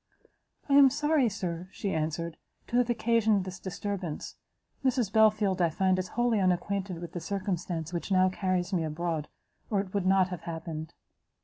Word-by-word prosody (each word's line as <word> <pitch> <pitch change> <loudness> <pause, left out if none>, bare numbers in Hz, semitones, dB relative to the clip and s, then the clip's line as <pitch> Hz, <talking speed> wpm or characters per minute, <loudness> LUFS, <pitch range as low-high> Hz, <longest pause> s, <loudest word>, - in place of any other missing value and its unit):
"I 280 - +1
am 280 -1 +8
sorry, 295 -2 +2
Sir," 180 -3 -4
she 200 - -3
answered, 160 +1 -2 0.3
"to 240 - -1
have 245 -1 +3
occasioned 225 -4 +2
this 185 0 -7
disturbance; 190 -4 -4 0.5
Mrs 245 -6 +1
Belfield, 215 -4 +4
I 170 - +4
find, 185 +3 +1
is 185 - -2
wholly 240 -3 +3
unacquainted 185 0 0
with 170 -1 -7
the 175 - -4
circumstance 180 -4 -3
which 175 +3 -4
now 185 -1 +5
carries 185 0 -1
me 170 -3 +1
abroad, 160 0 -2 0.4
or 205 - +1
it 195 -1 -4
would 200 -2 0
not 190 -1 +4
have 180 -3 -5
happened." 160 -1 -6
185 Hz, 170 wpm, -29 LUFS, 170-210 Hz, 0.5 s, am